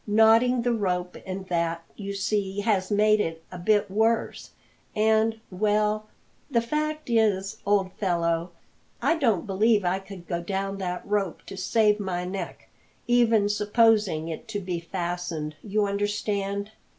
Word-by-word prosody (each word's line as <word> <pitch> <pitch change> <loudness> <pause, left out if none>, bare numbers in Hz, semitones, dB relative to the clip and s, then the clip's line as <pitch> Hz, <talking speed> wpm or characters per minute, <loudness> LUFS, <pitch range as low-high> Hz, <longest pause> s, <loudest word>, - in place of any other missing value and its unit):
Knotting 225 +3 +5
the 245 0 +2
rope 180 -5 -1
and 190 0 -5
that, 170 -1 -1
you 200 -1 -5
see, 200 0 -1
has 200 -3 +1
made 215 +1 +4
it 165 -3 -4
a 180 - -7
bit 205 +2 +2
worse, 220 +3 0 0.5
and 220 +1 +2
well, 210 +2 +1 0.4
the 245 -5 +3
fact 305 +5 -2
is, 215 -4 +1
old 195 -2 +2
fellow, 170 -3 0 0.5
I 330 - +2
don't 225 - +2
believe 205 +1 +2
I 180 +2 +1
could 195 -2 -11
go 170 -2 -2
down 195 +2 -3
that 180 -1 -3
rope 200 -4 -1
to - - -8
save 210 +2 +2
my 180 -3 -2
neck, 185 -1 -6 0.4
even 230 -4 +4
supposing 210 -5 +2
it 165 +8 -6
to 215 -2 -3
be 180 -3 -3
fastened, 170 -3 -4
you 210 0 0
understand." 200 0 -2
200 Hz, 145 wpm, -26 LUFS, 180-215 Hz, 0.5 s, Knotting